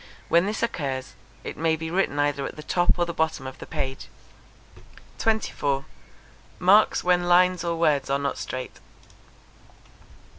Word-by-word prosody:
When 170 +3 +4
this 215 +2 -2
occurs, 135 - -3 0.3
it - - -6
may 160 0 +2
be 160 +1 -5
written 180 -5 0
either 145 -1 +1
at - - -9
the 150 - -9
top 175 +3 +2
or 175 - +2
the 170 - -5
bottom 160 -4 -1
of 130 0 -8
the - - -9
page. 135 0 -4 1.1
24. 145 -11 0 0.7
Marks 200 +4 +4
when 180 0 +2
lines 180 0 +4
or 170 -1 -1
words 150 -5 +2
are 140 - +2
not 140 0 -3
straight. 130 -1 -6
160 Hz, 150 wpm, -25 LUFS, 140-180 Hz, 1.1 s, When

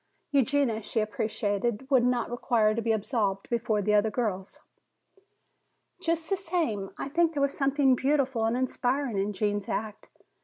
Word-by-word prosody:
Eugenia, 270 -4 +2
she 220 +2 -2
appreciated, 215 +2 -1
would 255 -3 +5
not 245 -1 0
require 230 -3 +2
to 230 - -2
be 225 0 0
absolved 205 -3 -1
before 225 -3 0
the 210 +2 +1
other 210 +1 +4
girls. 205 -4 -3 1.4
"Just 330 0 -1
the 390 - +1
same, 325 - -2
I - - -4
think 330 +3 +2
there 285 - -1
was 280 - 0
something 275 -1 +3
beautiful 265 -3 +1
and 225 +2 +1
inspiring 255 -2 -1
in 200 +2 0
Gene's 205 0 -2
act. 215 -1 -4
235 Hz, 155 wpm, -28 LUFS, 210-275 Hz, 1.4 s, would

